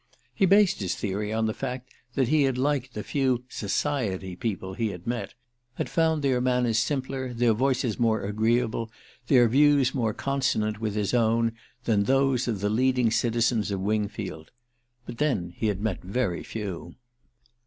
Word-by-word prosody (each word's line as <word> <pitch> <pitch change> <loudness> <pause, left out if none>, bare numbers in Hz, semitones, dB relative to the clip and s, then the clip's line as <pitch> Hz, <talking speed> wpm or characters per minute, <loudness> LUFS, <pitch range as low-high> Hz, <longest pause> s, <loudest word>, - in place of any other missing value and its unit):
He 195 - +2
based 200 0 +4
his 95 -4 -2
theory 105 +1 -3
on 110 0 0
the 110 - 0
fact 125 0 -6 0.2
that 130 -3 +2
he 155 0 +4
had 135 -2 +1
liked 135 -1 -1
the 105 - -4
few 130 -4 0
"society" 100 -5 -2
people 95 -1 -4
he 115 +3 -1
had 90 -3 -8
met 120 0 -3 0.4
had - - -4
found 160 -2 +2
their 130 -3 +2
manners 125 -3 +2
simpler, 130 +1 -2
their 115 -1 +3
voices 130 -1 0
more 115 -2 +2
agreeable, 115 +2 0 0.4
their 125 -3 +6
views 140 +1 +4
more 115 -5 -1
consonant 130 -6 -1
with 105 -2 -2
his 105 0 -1
own, 115 -1 +2 0.3
than 105 -4 +2
those 135 -1 +2
of 110 -5 -2
the 105 - +1
leading 125 0 +2
citizens 115 -2 +1
of 100 -2 -2
Wingfield. 100 -4 -3 0.6
But 115 - -8
then 110 - 0
he 110 - -1
had 100 -2 -1
met 105 -4 -2
very 95 -2 -2
few. 100 -6 -6
115 Hz, 165 wpm, -26 LUFS, 105-130 Hz, 0.6 s, their